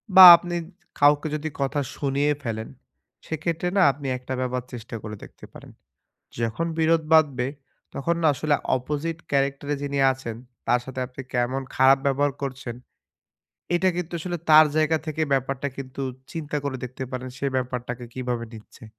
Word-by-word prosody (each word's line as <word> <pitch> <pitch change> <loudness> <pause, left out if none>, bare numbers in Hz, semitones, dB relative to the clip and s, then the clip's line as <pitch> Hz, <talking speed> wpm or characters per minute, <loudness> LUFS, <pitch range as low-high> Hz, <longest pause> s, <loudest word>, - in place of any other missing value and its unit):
বা 190 - +12
আপনি 175 +1 -4 0.4
কাউকে 145 +2 +4
যদি 155 +1 -3
কথা 140 +1 0 0.2
শুনিয়ে 140 +1 +1
ফেলেন। 110 -2 -4 0.6
সেক্ষেত্রে 160 +2 -2
না - - +5
আপনি 140 +1 -8
একটা 125 +1 -6
ব্যাপার 125 0 -1
চেষ্টা 120 -1 -7
করে 105 0 -6
দেখতে - - -13
পারেন। - - -12 0.7
যখন 115 +8 -1
বিরোধ 160 0 +3
বাধবে 140 -6 +4 0.5
তখন 170 +5 -1
না 160 - +4
আসলে 145 +2 +1 0.2
অপজিট 150 +5 -3
ক্যারেক্টরে 140 +1 0
যিনি 140 0 -2
আছেন 130 -4 -6 0.3
তার 125 - +4
সাথে 130 0 -6
আপনি 125 +1 -9
কেমন 125 +2 0
খারাপ 130 +1 +6
ব্যবহার 140 +1 +2
করছেন, 130 -3 -5 1.0
এটা 185 +2 +3
কিন্তু 175 -1 -4
আসলে 175 +1 -3
তার 155 0 +9
জায়গা 155 +1 +3
থেকে 155 0 -2
ব্যাপারটা 135 +1 0
কিন্তু 135 0 -7 0.3
চিন্তা 150 -2 -4
করে 140 -2 -2
দেখতে 130 +1 -6
পারেন। 130 0 -5
সে 140 - -1
ব্যাপারটাকে 125 -1 -3
কিভাবে 125 -2 -3
নিচ্ছে। 110 +1 -13
140 Hz, 155 wpm, -24 LUFS, 125-155 Hz, 1.0 s, বা